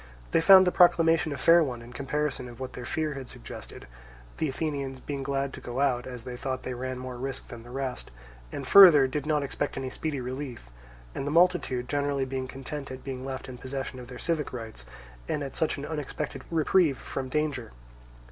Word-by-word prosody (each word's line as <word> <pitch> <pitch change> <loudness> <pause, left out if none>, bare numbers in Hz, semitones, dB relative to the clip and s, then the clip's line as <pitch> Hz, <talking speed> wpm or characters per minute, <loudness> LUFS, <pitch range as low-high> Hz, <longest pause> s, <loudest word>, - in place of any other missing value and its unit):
They - - +4
found 190 +2 +9
the 180 - +3
proclamation 165 -3 +4
a 140 - -3
fair 170 0 +6
one 125 -5 -4
in 120 +1 -12
comparison 140 -2 -2
of 120 0 -12
what 130 -1 -5
their 125 - -7
fear 155 -1 -1
had 135 -2 -7
suggested; - - -9 0.5
the 155 - +1
Athenians 140 -2 -3
being 140 +1 -5
glad 135 0 -1
to - - -8
go 120 +2 -5
out, 130 -3 +1
as 125 -2 -7
they 125 0 -6
thought 130 +1 -4
they 130 - -3
ran 130 +1 -4
more 125 -1 -6
risk 135 +2 -5
than 120 - -8
the 120 - -13
rest, 130 -1 -4 0.4
and 140 - -5
further, 170 -4 +9
did 145 +2 -3
not 150 -2 +2
expect 140 - -3
any 130 -1 -3
speedy 155 -4 -3
relief, 125 - -6 0.4
and 135 - -4
the - - +1
multitude 160 -7 +3
generally 140 -1 0
being 130 0 -3
content 135 +2 -7
at 130 0 -8
being 130 -2 -5
left 135 0 -5
in 125 -2 -9
possession 130 0 -5
of 125 - -9
their 125 0 -9
civic 160 -1 -1
rights, 115 -3 -7 0.4
and 145 - -1
at 135 - -6
such 160 - 0
an 140 - -5
unexpected 150 -1 -4
reprieve 160 -2 +3
from 130 -1 -5
danger. 140 -5 -1
135 Hz, 205 wpm, -28 LUFS, 130-150 Hz, 0.5 s, found